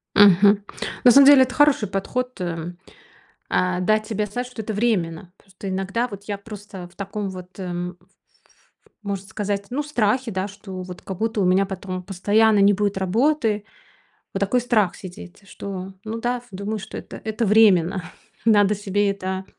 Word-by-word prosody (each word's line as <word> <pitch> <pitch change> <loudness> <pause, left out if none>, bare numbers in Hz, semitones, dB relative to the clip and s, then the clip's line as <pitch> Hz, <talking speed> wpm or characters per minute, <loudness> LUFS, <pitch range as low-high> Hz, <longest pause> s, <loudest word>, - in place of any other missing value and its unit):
Мгм. 200 +1 +7 0.5
На 245 - +9
самом 275 +3 +8
деле, 280 -2 +9
это 255 0 0
хороший 290 -7 +3
подход, 250 +5 -3
э, 170 -1 -4 0.8
а, 185 0 +1
дать 215 +3 +1
себе 210 -1 -2
знать, 245 +5 -4
что 245 -3 -7
это 220 - -4
временно. 180 -6 -1
Просто 195 0 -10
иногда 195 +6 -1
вот 200 -1 -9
я 205 -1 -4
просто 200 -3 -9
в 175 - -24
таком 200 0 -4
вот, 185 0 -11
эм, 180 -1 -4
ф 175 - -23 0.5
ф - - -33 0.3
можно 200 -2 -4
сказать, 200 -1 -3
ну 285 +4 -1
в - - -11
страхе, 245 -2 0
да, 190 +1 -2
что 195 -2 -8
вот 180 -1 -9
как 190 -2 -6
будто 225 -1 -1
у 190 - +2
меня 190 +2 +3
потом 185 -1 -5
постоянно 205 +3 +3
не 200 +1 +6
будет 200 -1 0
работы. 220 +2 +1 0.7
Вот 195 - -2
такой 205 +5 +1
страх 215 -7 +1
сидит, 180 0 -11
что 190 -1 -7
ну 225 +1 -5
да 245 +1 -1
ф 245 0 -14
думаю, 200 +3 -4
что 190 - -8
это - - -9
это 220 +1 -1
временно. 195 -4 +4 0.4
Надо 210 -2 +4
себе 205 0 0
это 190 -1 -4
200 Hz, 180 wpm, -22 LUFS, 190-220 Hz, 0.8 s, На